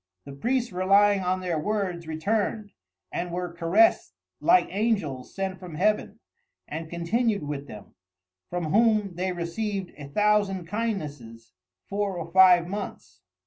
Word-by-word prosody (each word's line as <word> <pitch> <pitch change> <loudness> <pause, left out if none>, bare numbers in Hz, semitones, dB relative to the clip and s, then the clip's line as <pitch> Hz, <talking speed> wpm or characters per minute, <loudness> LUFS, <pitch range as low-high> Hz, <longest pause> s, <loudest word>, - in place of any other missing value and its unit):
The - - -9
Priests 240 - -1
relying 195 +2 +4
on 185 0 -1
their 175 -4 -1
words, 185 -3 -2
returned, 205 +5 -1 0.4
and 175 0 -3
were 175 0 -4
caress'd 170 - +3 0.2
like 360 +2 +5
Angels 195 - -1
sent 190 -1 -3
from 180 -4 -9
Heaven; 210 +6 0 0.5
and 160 +1 -6
continued 200 +4 0
with 145 -1 -5
them, 105 -5 -11 0.6
(from 175 -3 -3
whom 215 -3 +3
they 185 +2 -2
received 185 +3 -3
a 145 - -7
Thousand 205 +1 +1
kindnesses) 150 - -5 0.3
four 200 -2 -2
or 170 0 -6
five 180 -2 +6
months. 190 - -7
185 Hz, 135 wpm, -26 LUFS, 165-210 Hz, 0.6 s, five